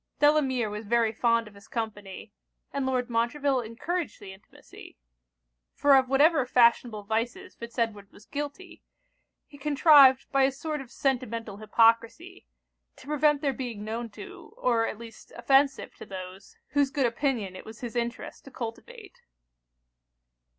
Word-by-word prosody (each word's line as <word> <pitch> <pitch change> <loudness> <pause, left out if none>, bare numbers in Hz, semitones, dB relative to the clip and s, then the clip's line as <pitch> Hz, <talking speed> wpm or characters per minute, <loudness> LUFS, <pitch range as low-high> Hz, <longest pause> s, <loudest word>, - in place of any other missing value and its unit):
Delamere 275 -6 +3
was 210 +1 -7
very 230 0 +2
fond 230 0 +1
of 210 - -14
his 200 0 -17
company; 210 -4 -6 0.4
and 275 -1 -2
Lord 250 -2 0
Montreville 255 +3 0
encouraged 300 +10 -4
the 195 -2 -10
intimacy: 190 - -16 0.8
for 285 -1 +5
of 260 -1 +3
whatever 290 +2 +4
fashionable 235 -3 +3
vices 235 - -3
Fitz 235 +1 -10
Edward 210 -4 -2
was 205 - -18
guilty, 295 +5 -7 0.6
he 285 - -16
contrived, 280 -2 +6
by 275 -1 +2
a 265 +1 +4
sort 300 +2 -5
of 265 - -12
sentimental 230 -6 -2
hypocrisy, 230 - +1 0.5
to - - -16
prevent 295 0 +2
their 280 -3 0
being 240 -5 -6
known 230 +2 -4
to, 385 - -12
or 235 - +1
at - - -5
least 230 -1 -13
offensive 270 0 +2
to - - -10
those, 185 0 -10
whose 285 0 +2
good 275 -1 0
opinion 235 -6 -1
it - - -9
was 220 +1 -12
his 240 -1 -6
interest 235 0 -4
to - - -10
cultivate. 390 - -9
245 Hz, 150 wpm, -27 LUFS, 225-285 Hz, 0.8 s, contrived